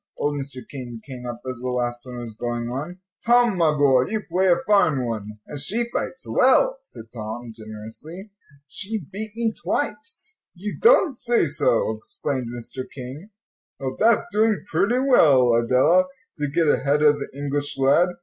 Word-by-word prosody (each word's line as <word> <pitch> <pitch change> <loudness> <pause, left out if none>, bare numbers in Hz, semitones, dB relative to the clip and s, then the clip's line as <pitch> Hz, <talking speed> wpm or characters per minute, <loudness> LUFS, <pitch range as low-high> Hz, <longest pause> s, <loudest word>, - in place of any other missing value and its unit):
Old 145 - 0
Mr. 135 -2 -9
King 125 -4 -8
came 125 -2 -8
up 120 0 -7
as 130 -2 -4
the 125 - -3
last 120 -1 -1
one 125 0 -9
was 120 -2 -7
going 120 +1 -3
on. 150 +8 -5 0.3
"Tom, 240 -2 +4
my 165 -3 +3
boy, 135 -3 +4
you 215 0 -2
play 185 +3 +1
a 175 - +6
fine 160 - +3
one." 105 -2 -5
"And 145 - -6
she 230 - 0
fights 260 -1 -3
well," - - +3
said 115 - -13
Tom, 115 +1 -6
generously. 110 - -9 0.4
"She 205 +10 -3
beat 205 +4 -6
me 230 -1 0
twice." 440 - -4 0.2
"You 200 +4 -5
don't 415 - +5
say 240 -3 +1
so," 135 -7 +1
exclaimed 125 +3 -4
Mr. 120 +2 -6
King. 135 +9 -9 0.5
"Well, 130 -1 -3
that's 225 0 +4
doing 215 0 +2
pretty 200 +9 +1
well, 145 - +5
Adela, 130 +10 +4 0.3
to 145 - 0
get 165 +2 +1
ahead 145 0 +2
of 145 -1 +5
the - - -5
English 145 0 -2
lad. 140 +7 +4
145 Hz, 170 wpm, -23 LUFS, 125-205 Hz, 0.5 s, a